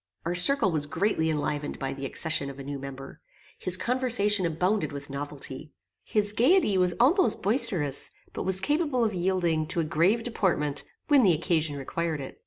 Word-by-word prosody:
Our 170 - -2
circle 190 +3 +4
was 150 -2 -1
greatly 160 -1 -1
enlivened 150 -1 -3
by 135 -1 -4
the 135 0 -6
accession 145 -1 -1
of 140 - -10
a 140 - -8
new 140 0 -6
member. 135 0 -10 0.4
His 185 0 +2
conversation 215 -6 +2
abounded 180 +6 -1
with 140 -1 -8
novelty. 145 0 -7 0.3
His 205 -1 -1
gaiety 245 - +2
was 180 -1 +1
almost 330 - +2
boisterous, 195 - +4 0.2
but - - -5
was 190 0 +4
capable 290 - 0
of 215 - -2
yielding 175 -4 -1
to 170 - -1
a - - +1
grave 170 +9 +1
deportment 165 -11 -1 0.2
when 290 -3 +5
the 190 -7 +4
occasion 160 -2 -1
required 160 +3 -4
it. 135 - -9
175 Hz, 175 wpm, -26 LUFS, 145-210 Hz, 0.4 s, when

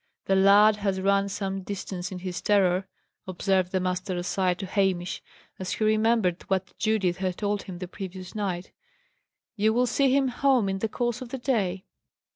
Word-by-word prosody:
"The 195 - +2
lad 205 +2 +6
has 195 -2 -1
run 200 +1 +2
some 195 -1 -3
distance 190 -1 -5
in 185 - -5
his 180 -1 -5
terror," 190 -2 +2 0.4
observed 185 0 0
the 185 - +1
master 185 +1 -2
aside 180 0 0
to 195 - -5
Hamish, 185 -2 0 0.4
as 185 -1 -3
he - - -2
remembered 215 -4 +2
what 190 -1 -1
Judith 200 -5 +1
had 185 -2 -2
told 205 -1 -1
him 185 -2 -8
the 180 0 -6
previous 185 -1 -8
night. 190 -4 -3 0.8
"You 215 0 +2
will 245 +2 +3
see 270 +2 +2
him 270 -1 +3
home 250 -3 +2
in 195 0 -2
the 225 - -1
course 240 +2 -2
of 255 - -7
the 265 - -4
day." 200 -8 -1
195 Hz, 180 wpm, -26 LUFS, 185-215 Hz, 0.8 s, lad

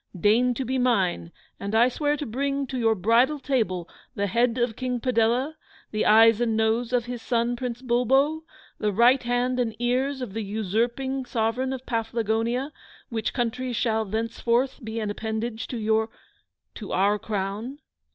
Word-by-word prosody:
Deign 240 +6 +3
to 265 - -3
be 260 +2 -1
mine, 190 - +1 0.3
and 200 +2 -3
I 235 +2 +6
swear 290 +3 0
to 290 - -4
bring 275 +4 -1
to 260 0 -4
your 225 -1 +3
bridal 230 +9 +3
table 220 -11 -1 0.3
the 200 - 0
head 235 +4 +1
of 240 -2 0
King 250 0 -2
Padella, 245 +4 +1 0.4
the 215 - 0
eyes 225 +1 +6
and 225 -2 +1
nose 225 +2 +1
of 245 -2 +1
his 245 -1 -6
son 235 +1 0
Prince 245 0 -5
Bulbo, 265 +6 +2 0.4
the 210 - +1
right 240 +6 +5
hand 245 +1 0
and 230 -3 -1
ears 255 +3 0
of 215 -6 -7
the 225 - -3
usurping 235 +6 -1
Sovereign 240 +3 -1
of 260 -1 -5
Paflagonia, 230 +3 -1 0.4
which 225 -2 -2
country 250 +1 -2
shall 220 -1 +1
thenceforth 235 +5 -1
be 225 +1 -4
an 210 -2 -2
appanage 220 +1 -4
to 245 - -5
your 220 0 +1 0.6
to 210 - -8
OUR 205 +2 +2
Crown! 210 +6 -4
235 Hz, 165 wpm, -25 LUFS, 220-255 Hz, 0.6 s, I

